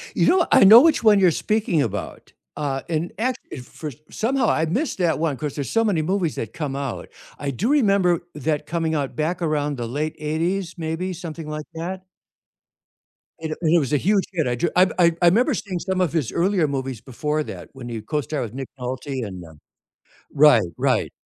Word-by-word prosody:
You - - +3
know, 360 -1 +4
I - - +7
know 215 +4 +10
which 315 -6 +3
one 210 -2 +6
you're 185 -2 +5
speaking 210 -5 0
about, 105 -5 -5 0.2
uh, 135 -2 -2
and 165 +1 -2
act 255 +3 0
it 125 -4 -7
first 150 0 -8
somehow 260 +4 0
I 160 - +2
missed 245 - -1
that 165 -3 +1
one 160 -4 0
'cause 150 +1 -5
there's 140 -2 -4
so 225 - +2
many 200 -8 +1
movies 180 -1 -1
that 110 -1 -5
come 145 -4 -4
out. 140 -3 -4 0.3
I 140 -1 -3
do 185 - -2
remember 200 - +3
that 150 +1 -2
coming 160 0 -1
out 140 -3 -2
back 170 +3 -1
around 150 -2 0
the 120 -3 -4
late 150 +6 -3
80's, 165 +4 -2
maybe 165 +3 -3
something 165 -3 -7
like 150 0 -5
that? 185 +3 -5 1.3
It, 160 -1 -4
uh - - -2
and 165 -1 +2
it - - +6
was 140 -2 -2
a - - +5
huge 195 +6 +2
hit, 160 -7 -1
I 120 - 0
ju 170 +8 0
I 180 -2 +4
I 175 - +7
'member 245 - +2
seeing 190 -4 -3
some 190 +1 -2
of 175 -4 0
his 150 -9 0
earlier 180 -2 +1
movies 135 -4 -4
before 150 +4 -2
that - - -9
when 125 -2 -8
he 115 -2 -5
co-starred 150 +5 -2
with 115 -2 -7
Nick 135 0 -6
Nolte 130 0 -4
and 95 -3 -8
um 80 -2 -15 0.8
Right, 140 -9 +6
right. - - 0
160 Hz, 205 wpm, -22 LUFS, 140-185 Hz, 1.3 s, know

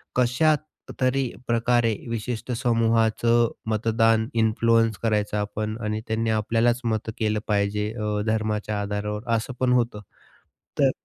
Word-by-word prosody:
कशातरी 135 -1 0 0.2
प्रकारे 115 -1 +2
विशिष्ट 115 +1 -4
समूहाचं 115 -1 +2 0.2
मतदान 115 0 +2
इन्फ्लुअन्स 115 -1 +2
करायचं 105 -2 0
आपण 105 +1 -3
आणि 105 0 -2
त्यांनी 110 0 -1
आपल्यालाच 115 +3 +1
मतं 110 -1 -1
केलं 110 -1 +1
पाहिजे 105 0 0
अ, 105 -2 -2
धर्माच्या 110 -1 -1
आधारावर 105 +1 -3
असं 110 +3 -3
पण 125 -1 +2
होतं. 120 -3 +1 0.8
तर 135 -2 +5
115 Hz, 115 wpm, -24 LUFS, 105-120 Hz, 0.8 s, तर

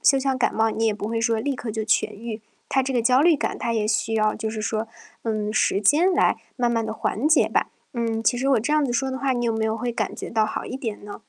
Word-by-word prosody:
就 275 - +5
像 265 -1 0
感 245 - +1
冒 225 0 +2
你 225 +1 0
也 215 - +2
不 205 0 -5
会 230 0 -1
说 230 -1 +1
立 275 +5 -1
刻 245 -3 -5
就 220 0 -3
痊 220 +1 +2
愈。 220 +1 -6 0.3
它 265 - +2
这 265 +1 -2
个 245 - +2
焦 250 +3 +4
虑 335 -1 +5
感， - - -2
它 235 - -2
也 220 -2 0
需 220 +1 0
要 215 -1 +2
就 220 0 -3
是 215 0 -5
说， 220 +1 -2 0.3
嗯， 215 -2 -2
时 200 -2 +2
间 310 - +4
来 - - +3 0.2
慢 245 -2 +1
慢 230 -1 0
地 220 - -3
缓 225 +5 -1
解 315 - +4
吧。 - - 0 0.2
嗯， 230 -3 -1
其 245 - +3
实 265 +3 0
我 270 -3 +4
这 280 +7 -1
样 300 -1 +3
子 245 - -1
说 265 +3 0
的 260 - -3
话， 265 0 0
你 240 -1 -1
有 230 - +1
没 220 - 0
有 220 0 0
会 240 +1 -3
感 225 -2 -3
觉 - - -6
到 220 -1 +2
好 215 - -4
一 255 - -5
点 225 -6 -5
呢？ 205 - -8
230 Hz, 315 characters per minute, -24 LUFS, 220-260 Hz, 0.3 s, 就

